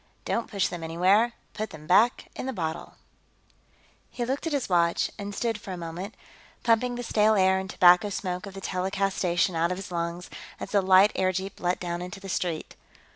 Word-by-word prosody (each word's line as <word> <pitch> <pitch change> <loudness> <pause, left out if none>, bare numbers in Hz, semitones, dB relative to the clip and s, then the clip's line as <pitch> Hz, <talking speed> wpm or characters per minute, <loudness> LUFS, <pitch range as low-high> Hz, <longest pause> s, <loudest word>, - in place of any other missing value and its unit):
Don't 230 - -1
Push 200 -3 0
Them 175 -2 -6
Anywhere 190 +8 +3 0.2
Put 215 +1 -4
Them 155 -1 -11
Back 210 +8 +3
in - - -5
the 265 - -2
Bottle 160 -4 -4 1.1
He 240 - -3
looked 270 +6 -2
at - - -2
his 280 -3 0
watch, 170 -2 +2
and 200 0 -5
stood 225 -2 -1
for 190 - -6
a - - -5
moment, 175 +5 -6 0.5
pumping 245 +2 +2
the 245 - -4
stale 215 -1 +3
air 190 -1 +4
and 190 0 -6
tobacco 180 +3 +5
smoke 185 0 -4
of 195 - -10
the 195 - -7
telecast 195 +1 -1
station 175 0 +1
out 165 +2 +1
of 180 - -2
his 195 -1 -8
lungs, 170 +1 -4 0.3
as - - -6
the 200 - +4
light 190 +2 +6
airjeep 190 +1 -1
let 180 0 0
down 175 -1 -3
into 180 +3 -7
the 195 0 -9
street. 170 -3 -3
190 Hz, 200 wpm, -27 LUFS, 175-210 Hz, 1.1 s, light